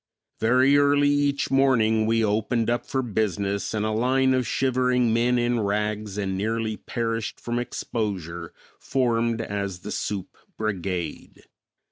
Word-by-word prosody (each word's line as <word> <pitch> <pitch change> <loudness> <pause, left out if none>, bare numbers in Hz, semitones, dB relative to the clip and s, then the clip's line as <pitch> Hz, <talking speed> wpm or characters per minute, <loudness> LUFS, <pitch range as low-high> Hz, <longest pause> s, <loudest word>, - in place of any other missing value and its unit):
Very 130 +5 +4
early 145 0 +4
each 145 -1 +1
morning 115 -5 +3
we 115 0 +2
opened 110 +3 0
up 120 - -2
for 130 -1 -1
business 100 -3 -1
and 110 -1 -1
a 110 - 0
line 130 +4 +2
of 130 -2 0
shivering 125 -2 +1
men 120 +2 +2
in 120 0 +1
rags 105 0 -2
and 95 -2 -1
nearly 110 +2 -1
perished 115 0 -3
from 120 0 -2
exposure 95 -9 -4 0.3
formed 115 -3 0
as 100 -4 -4
the 105 - -6
soup 100 -3 -4 0.2
brigade. 95 -6 -4
115 Hz, 135 wpm, -25 LUFS, 105-125 Hz, 0.3 s, Very